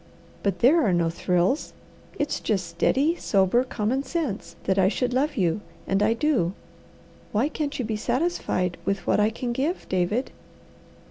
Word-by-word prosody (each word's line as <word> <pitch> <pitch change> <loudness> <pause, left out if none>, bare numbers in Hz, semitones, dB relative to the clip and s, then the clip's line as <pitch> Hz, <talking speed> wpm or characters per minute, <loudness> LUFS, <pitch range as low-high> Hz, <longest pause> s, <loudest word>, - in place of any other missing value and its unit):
But 195 -3 -1
there 300 +8 +6
are 200 -6 +2
no 170 -1 +2
thrills; 180 - 0 0.4
it's 290 0 -1
just 195 -5 -1
steady, 265 - +1
sober, 195 +5 +2
common 255 +1 -1
sense 275 - -3
that 190 0 +1
I 190 - +5
should 245 +4 0
love 280 +3 0
you, 180 0 +1 0.2
and 195 +1 +1
I 215 +2 +4
do. 230 - +1 0.8
Why 225 +7 +2
can't 290 -2 -3
you 255 - -2
be 215 -1 -2
satisfied 240 - -1
with 195 +2 -2
what - - +2
I 210 +1 +4
can 240 +2 -4
give, 290 +9 -2
David?" 190 +7 0
220 Hz, 160 wpm, -25 LUFS, 190-270 Hz, 0.8 s, there